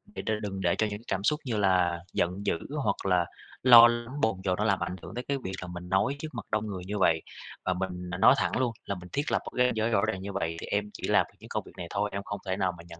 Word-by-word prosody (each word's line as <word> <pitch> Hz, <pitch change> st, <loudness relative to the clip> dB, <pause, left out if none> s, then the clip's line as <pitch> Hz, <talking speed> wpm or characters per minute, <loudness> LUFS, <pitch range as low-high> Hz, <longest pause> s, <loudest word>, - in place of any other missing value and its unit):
để -, -, -4 dB
cho 110 Hz, -, +1 dB
đừng 95 Hz, -2 st, -4 dB
để 85 Hz, -2 st, +2 dB
cho 110 Hz, -, +2 dB
những 105 Hz, +1 st, -6 dB
cảm 95 Hz, 0 st, -1 dB
xúc 150 Hz, +8 st, +2 dB
như 115 Hz, -4 st, -1 dB
là 90 Hz, -3 st, +3 dB
giận 90 Hz, +4 st, -1 dB
dữ, 85 Hz, -, +1 dB, 0.2 s
hoặc -, -, -1 dB
là 90 Hz, -2 st, +3 dB, 0.4 s
lo 120 Hz, -2 st, +10 dB
lắng, 120 Hz, +4 st, -3 dB
bồn 110 Hz, -3 st, +2 dB
chồn 90 Hz, -1 st, +1 dB
nó 105 Hz, -, 0 dB
làm 100 Hz, -3 st, +2 dB
ảnh -, -, -3 dB
hưởng 105 Hz, -, -9 dB
tới 125 Hz, -, -3 dB
cái 140 Hz, -, 0 dB
việc 95 Hz, -, -3 dB
là 90 Hz, -, -6 dB
mình 90 Hz, 0 st, -8 dB
nói 115 Hz, +9 st, +2 dB
trước 155 Hz, -, -4 dB
mặt 115 Hz, -5 st, -6 dB
đông 110 Hz, 0 st, 0 dB
người 95 Hz, -3 st, -5 dB
như 105 Hz, +2 st, -3 dB
vậy. 80 Hz, -3 st, +3 dB, 0.4 s
Và 95 Hz, -, +2 dB
mình 90 Hz, -1 st, -4 dB
n -, -, -8 dB
nói -, -, +8 dB
thẳng -, -, 0 dB
luôn, 130 Hz, -2 st, +1 dB
là 100 Hz, -, -2 dB
mình 90 Hz, -1 st, -10 dB
thiết 145 Hz, +1 st, -1 dB
lập -, -, +3 dB
một -, -, -6 dB
cái 125 Hz, -, +5 dB
ranh 125 Hz, -, +1 dB
giới 110 Hz, +1 st, +1 dB
rõ 110 Hz, -4 st, +3 dB
ràng: 95 Hz, -, -2 dB
"Như 100 Hz, +1 st, -5 dB
vậy 85 Hz, -4 st, -2 dB
thì -, -, -6 dB
em 105 Hz, 0 st, -1 dB
chỉ -, -, -5 dB
làm -, -, +4 dB
những -, -, -13 dB
công -, -, -2 dB
việc -, -, -13 dB
này 85 Hz, -, -5 dB
thôi, 105 Hz, +1 st, -1 dB
em 100 Hz, 0 st, -3 dB
không 100 Hz, 0 st, -5 dB
thể 95 Hz, 0 st, 0 dB
nào 95 Hz, -2 st, +1 dB
mà 85 Hz, -, -11 dB
nhận 85 Hz, -1 st, -11 dB
100 Hz, 310 wpm, -28 LUFS, 90-110 Hz, 0.4 s, lo